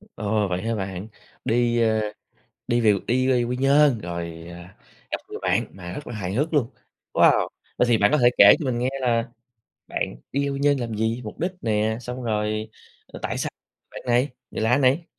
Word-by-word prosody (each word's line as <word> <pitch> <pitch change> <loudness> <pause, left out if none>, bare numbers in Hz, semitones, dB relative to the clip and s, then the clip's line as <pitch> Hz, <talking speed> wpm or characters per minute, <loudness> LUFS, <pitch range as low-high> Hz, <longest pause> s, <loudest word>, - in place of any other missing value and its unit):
Ồ! 105 0 0
Vậy 90 -1 -2
hả 115 +2 -1
bạn? 95 -1 -4 0.4
Đi, 120 0 +2
ờ, 110 -1 +2 0.7
đi 120 0 +2
về 110 -3 +5
đi 130 +2 +2
về 125 -2 +3
Quy 125 +1 -2
Nhơn 140 0 +4
rồi, 85 -3 -6
ờ, 85 - -9 0.5
gặp - - -1
người - - -6
bạn - - +2
mà 90 -2 -8
rất 145 - -7
là 120 - -6
hài 95 -3 -4
hước 150 +8 0
luôn, 130 -6 +2 0.4
wow! - - +4 0.3
Vậy 125 - +4
thì 115 -2 +4
bạn 100 - +4
có 150 - +4
thể 120 -2 +5
kể - - +10
cho - - -3
mình 125 -3 -1
nghe 125 +1 0
là 120 -2 +1 0.6
bạn - - -3 0.2
đi 140 +1 0
Quy 140 - -3
Nhơn 145 0 +3
làm 120 -4 -3
gì? 110 +2 0
Mục 105 - -8
đích 180 +3 -1
nè? 110 0 0
Xong 125 +1 -6
rồi, 110 -1 -1 0.5
tại - - -2
sao - - -2 0.4
bạn - - -8
này, 125 +3 +3 0.2
người - - -4
lạ 115 +3 +3
này? 140 +5 +3
115 Hz, 205 wpm, -24 LUFS, 105-130 Hz, 0.7 s, kể